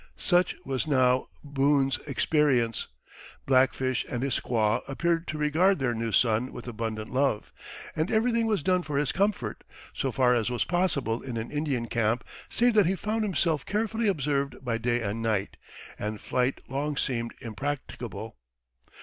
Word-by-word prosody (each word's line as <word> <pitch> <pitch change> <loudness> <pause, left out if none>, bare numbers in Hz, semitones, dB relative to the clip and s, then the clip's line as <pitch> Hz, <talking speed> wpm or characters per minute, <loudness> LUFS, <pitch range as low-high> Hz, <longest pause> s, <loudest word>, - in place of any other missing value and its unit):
Such 180 -1 +2
was 135 +2 -2
now 130 -3 +3 0.2
Boone's 140 -2 +2
experience. 135 -5 +2 0.6
Black 130 0 +5
Fish 130 -2 0
and 120 0 -2
his 140 - 0
squaw 110 -3 +1
appeared 165 +4 0
to 155 - -3
regard 160 +6 +3
their 130 -4 0
new 115 0 -2
son 115 +3 +2
with 120 - -9
abundant 110 -1 -4
love, 135 -5 0 0.4
and 155 +3 0
everything 230 +1 +2
was 210 -8 0
done 185 -1 +3
for 150 -4 -3
his 145 -1 +1
comfort, 190 - -1 0.3
so 135 - -1
far 125 0 +3
as 120 -1 +1
was 120 -2 0
possible 155 -10 0
in 125 -3 -5
an 110 +1 -4
Indian 145 -5 -1
camp, 115 +1 0 0.3
save 240 0 +3
that 210 -5 +5
he 190 - +2
found 215 +4 -2
himself 170 -7 +1
carefully 220 +2 -1
observed 140 -6 -1
by 115 -2 0
day 120 +1 0
and 105 +2 -2
night, 105 -3 -1 0.4
and 105 0 -3
flight 125 +1 -1
long 145 +2 -2
seemed 115 -4 -1
impracticable. 130 - -5
135 Hz, 160 wpm, -28 LUFS, 120-160 Hz, 0.6 s, Black